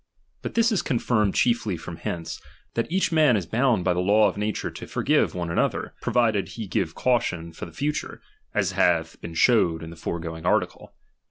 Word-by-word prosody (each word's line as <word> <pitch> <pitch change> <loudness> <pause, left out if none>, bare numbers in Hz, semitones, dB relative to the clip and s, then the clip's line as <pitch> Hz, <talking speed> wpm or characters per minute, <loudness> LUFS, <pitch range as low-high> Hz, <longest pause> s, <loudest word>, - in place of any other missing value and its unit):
But - - -6
this 230 +1 +4
is 210 - +2
confirmed 115 - +1
chiefly 115 -6 +1
from 80 +1 -8
hence, 85 -3 -5 0.3
that 115 +6 -2
each 185 0 +1
man 155 -8 +4
is 95 - -3
bound 115 - +2
by 90 - +2
the 90 - -1
law 105 +3 +4
of 95 - -2
na 105 +1 -2
tnre 110 - -3
to - - -8
forgive - - +1
one 85 -2 -3
another, - - 0
provided 110 -5 +1
he 115 - -6
give 90 -3 -2
cau 125 -1 +3
tion 85 -7 -5
for 80 - -7
the - - -12
future, 145 - -3 0.3
as - - 0
hath 80 -2 +1
been 85 -1 -7
showed 85 -8 +3
in 80 - -8
the - - -10
foregoing 80 0 -5
article. - - 0
100 Hz, 200 wpm, -25 LUFS, 85-120 Hz, 0.3 s, this